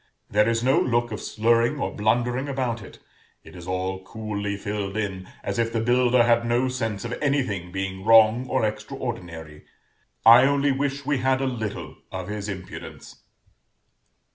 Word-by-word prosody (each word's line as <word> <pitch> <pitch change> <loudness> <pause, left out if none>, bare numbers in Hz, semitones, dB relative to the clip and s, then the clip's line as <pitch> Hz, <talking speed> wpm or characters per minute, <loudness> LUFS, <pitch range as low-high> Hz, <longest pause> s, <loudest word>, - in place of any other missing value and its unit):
There 105 +2 +3
is 115 0 0
no 130 +2 +4
look 120 -1 0
of 105 - -5
slurring 115 +5 +1
or - - -2
blundering 120 +5 0
about 125 -4 -2
it; - - -12 0.5
it - - -14
is 90 0 -10
all 95 +1 -3
coolly 105 -1 -4
filled 100 0 -4
in, 95 -3 -4
as 100 +2 -3
if 115 0 +1
the 115 - -1
builder 120 +1 +3
had 115 0 +3
no 120 +2 +1
sense 115 -4 -3
of 120 - -4
anything 130 - -1
being 95 0 -4
wrong 115 +3 +5
or - - +1
extraordinary: 90 - -6 0.6
I 120 +3 +9
only 140 0 +2
wish 140 +1 -2
we 145 -2 0
had 130 +1 +2
a 135 - -1
little 110 -6 -4
of 95 0 -5
his 105 0 -4
impudence. 95 -2 -8
115 Hz, 165 wpm, -24 LUFS, 100-125 Hz, 0.6 s, I